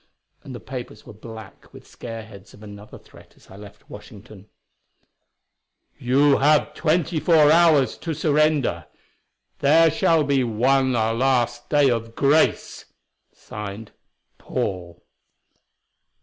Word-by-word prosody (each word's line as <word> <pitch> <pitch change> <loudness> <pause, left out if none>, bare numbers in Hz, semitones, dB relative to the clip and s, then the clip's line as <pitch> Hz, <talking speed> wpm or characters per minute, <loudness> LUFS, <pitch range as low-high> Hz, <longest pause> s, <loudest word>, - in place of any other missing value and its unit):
And 130 - -10
the - - -8
papers 125 -4 -9
were - - -12
black 110 +1 -13
with - - -15
scareheads 110 -4 -11
of 105 - -17
another 105 0 -12
threat - - -20
as - - -22
I - - -13
left 100 0 -15
Washington: 105 -1 -14 1.5
"You 135 +3 +2
have 150 +1 +2
twenty 160 +1 -1
four 155 -2 +4
hours 160 -5 +3
to 165 -2 -5
surrender. 150 - 0 0.7
There 160 +3 +4
shall 160 0 +1
be 140 -2 0
one 130 +4 +1
last 120 +1 -1
day 145 -3 +3
of 115 -1 -4
grace." 145 +3 0 0.5
Signed: 105 +1 -10 0.5
"Paul." 85 -2 -5
125 Hz, 115 wpm, -22 LUFS, 110-150 Hz, 1.5 s, four